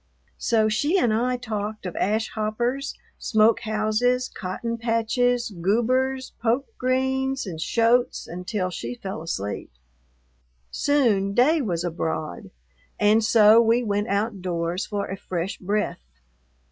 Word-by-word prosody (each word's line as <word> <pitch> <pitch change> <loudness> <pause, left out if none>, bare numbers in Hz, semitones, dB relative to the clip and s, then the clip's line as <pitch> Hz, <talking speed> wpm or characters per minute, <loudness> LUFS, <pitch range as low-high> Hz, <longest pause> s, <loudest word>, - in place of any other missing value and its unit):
So 220 -3 +2
she 290 - +1
and 240 - +2
I 250 +3 +1
talked 215 -3 -4
of 180 - -5
ash 220 +3 0
hoppers, 240 +6 -2 0.2
smoke 220 0 +3
houses, 220 +4 0
cotton 230 +6 -4
patches, 235 +1 +1
goobers, 250 +8 0
poke 245 - 0
greens, 265 +1 0
and 165 -5 -6
shoats, 235 +5 +2
until 185 +2 -3
she 120 -7 -5
fell 190 +3 -6
asleep. 105 -11 -4 1.0
Soon 220 -9 +2
day 305 +6 +4
was 175 -8 -2
abroad, 160 - -3 0.5
and 215 +2 +4
so 220 0 +6
we 230 +2 +3
went 205 -1 -1
outdoors 185 -3 -2
for 205 -1 -2
a 195 - -5
fresh 185 -1 -4
breath. 205 - -1
220 Hz, 120 wpm, -24 LUFS, 195-245 Hz, 1.0 s, so